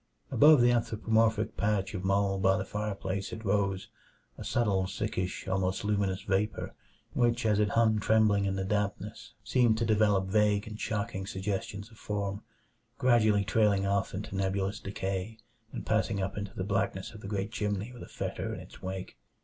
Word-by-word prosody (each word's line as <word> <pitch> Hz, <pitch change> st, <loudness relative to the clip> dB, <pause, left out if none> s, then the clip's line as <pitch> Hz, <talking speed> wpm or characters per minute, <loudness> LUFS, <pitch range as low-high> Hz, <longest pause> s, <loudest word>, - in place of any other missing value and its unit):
Above 150 Hz, -2 st, +7 dB
the 120 Hz, 0 st, +5 dB
anthropomorphic 110 Hz, -1 st, +1 dB
patch 105 Hz, -1 st, 0 dB
of 95 Hz, -2 st, -4 dB
mold 100 Hz, 0 st, +1 dB
by 95 Hz, 0 st, +4 dB
the 95 Hz, -, -2 dB
fireplace 100 Hz, -1 st, -3 dB
it 115 Hz, 0 st, -7 dB
rose; 100 Hz, -1 st, 0 dB, 0.5 s
a -, -, -8 dB
subtle, 100 Hz, -5 st, +1 dB
sickish, 95 Hz, -1 st, -3 dB
almost 95 Hz, +1 st, 0 dB
luminous 100 Hz, -2 st, 0 dB
vapor 100 Hz, +2 st, -1 dB, 0.4 s
which 120 Hz, -1 st, +2 dB
as 105 Hz, -1 st, +3 dB
it 105 Hz, -1 st, +3 dB
hung 110 Hz, -1 st, +3 dB
trembling 105 Hz, -1 st, +3 dB
in 95 Hz, 0 st, 0 dB
the 95 Hz, -, -1 dB
dampness 105 Hz, +1 st, -3 dB
seemed 115 Hz, 0 st, +3 dB
to 115 Hz, -, 0 dB
develop 105 Hz, -3 st, +3 dB
vague 105 Hz, +1 st, +2 dB
and 105 Hz, 0 st, -7 dB
shocking 100 Hz, -2 st, -2 dB
suggestions 100 Hz, +1 st, -4 dB
of 110 Hz, -, -17 dB
form, 100 Hz, -1 st, -3 dB, 0.6 s
gradually 110 Hz, -5 st, +4 dB
trailing 105 Hz, -2 st, +3 dB
off 100 Hz, -1 st, 0 dB
into 100 Hz, 0 st, -5 dB
nebulous 95 Hz, 0 st, -1 dB
decay 95 Hz, +2 st, -4 dB, 0.3 s
and -, -, -6 dB
passing 100 Hz, -, +1 dB
up 95 Hz, 0 st, -2 dB
into 100 Hz, -1 st, -5 dB
the 95 Hz, -, -2 dB
blackness 100 Hz, +1 st, -1 dB
of 110 Hz, -, -11 dB
the -, -, -7 dB
great 100 Hz, +1 st, -2 dB
chimney 105 Hz, +1 st, -2 dB
with 125 Hz, -, -11 dB
a -, -, -8 dB
fetor -, -, -4 dB
in -, -, -7 dB
its -, -, -13 dB
wake. 95 Hz, 0 st, -6 dB
100 Hz, 175 wpm, -30 LUFS, 95-110 Hz, 0.6 s, Above